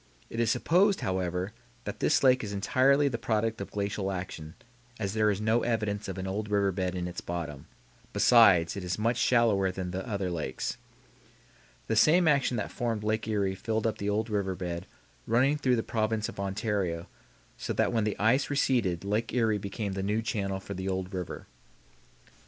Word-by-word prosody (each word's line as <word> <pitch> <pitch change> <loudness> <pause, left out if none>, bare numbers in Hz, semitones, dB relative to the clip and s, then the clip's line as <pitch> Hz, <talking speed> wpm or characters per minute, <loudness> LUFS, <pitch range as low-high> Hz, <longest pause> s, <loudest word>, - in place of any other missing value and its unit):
It 115 - -4
is 115 -2 +2
supposed, 190 - +3
however, 95 +1 -2 0.3
that - - -6
this - - +2
lake 130 -2 +5
is 105 -1 -4
entirely 130 +8 +3
the 120 -4 -2
product 115 -1 -1
of 100 - -5
glacial 100 -1 -2
action, 90 -3 -6 0.4
as 100 -2 -2
there 110 -1 +3
is 100 -1 0
no 110 +2 +2
evidence 105 -3 -1
of 95 -1 -5
an 95 - -4
old 105 +2 -3
river 100 -1 +2
bed 90 -1 -2
in 90 -1 -2
its 90 - -6
bottom; 80 -5 -5 0.4
besides, 95 -9 +5
it 100 - -5
is 90 0 -2
much 115 +2 +1
shallower 115 -7 +3
than 95 -1 -5
the 95 +2 -3
other 100 -4 -2
lakes. 80 -6 -3 1.1
The 110 - -1
same 165 +9 +5
action 140 -5 +3
that 105 - -3
formed 115 -3 -2
Lake 110 +1 -1
Erie 100 -3 0
filled 110 +3 -2
up 110 - -1
the 100 - -1
old 110 +2 0
river 100 -3 -1
bed 90 -2 -5 0.4
running 130 +6 +3
through 130 -3 +2
the 115 - -1
province 110 -1 -1
of - - -9
Ontario, 95 -4 -2 0.5
so - - -5
that - - +1
when 115 -2 +2
the 105 -1 -1
ice 115 +7 +2
receded 120 -11 +1
Lake 105 +3 -1
Erie 110 -4 +2
became 100 0 -4
the 95 - -3
new 105 +3 0
channel 100 -3 -2
for 100 - -7
the 95 0 -4
old 95 0 -3
river. 90 -2 -5
105 Hz, 190 wpm, -29 LUFS, 95-115 Hz, 1.1 s, lake